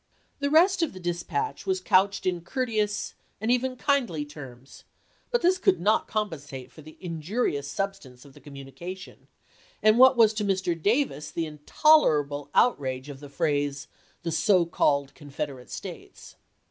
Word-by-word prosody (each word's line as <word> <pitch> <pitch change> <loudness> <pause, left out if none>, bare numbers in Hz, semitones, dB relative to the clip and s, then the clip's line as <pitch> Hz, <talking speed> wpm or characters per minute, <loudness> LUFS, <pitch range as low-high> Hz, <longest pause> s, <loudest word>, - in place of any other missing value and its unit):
The 285 0 0
rest 355 +5 +4
of 330 - 0
the 185 - -9
dispatch 175 - -3
was 380 -1 +1
couched 195 - +2
in 180 -2 0
cour 255 +10 -2
teous 210 -3 -2 0.3
and 220 +3 0
even 255 +1 +1
kindly 245 - 0
terms; 135 -3 -12 0.5
but 480 -4 0
this 365 +2 +3
could 385 0 +3
not 215 +4 +2
compensate 145 - -4
for 155 - -14
the 155 +1 -14
injurious 165 - -2
substance 170 -8 -5
of 140 - -16
the 145 - -15
communication, 145 +7 -10 0.6
and 215 +2 +5
what 260 0 +7
was 220 -2 +5
to 210 0 -2
Mr. 190 -3 0
Da^ds 200 - 0
the 165 - -2
intolerable 150 - +2
outrage 135 - +1
of 140 -2 -9
the 145 0 -11
phrase, 145 0 -1 0.4
"the 165 - -2
so 185 0 +3
called 140 -4 +1
Confederate 140 -3 -7
States." - - -9
175 Hz, 155 wpm, -26 LUFS, 145-230 Hz, 0.6 s, what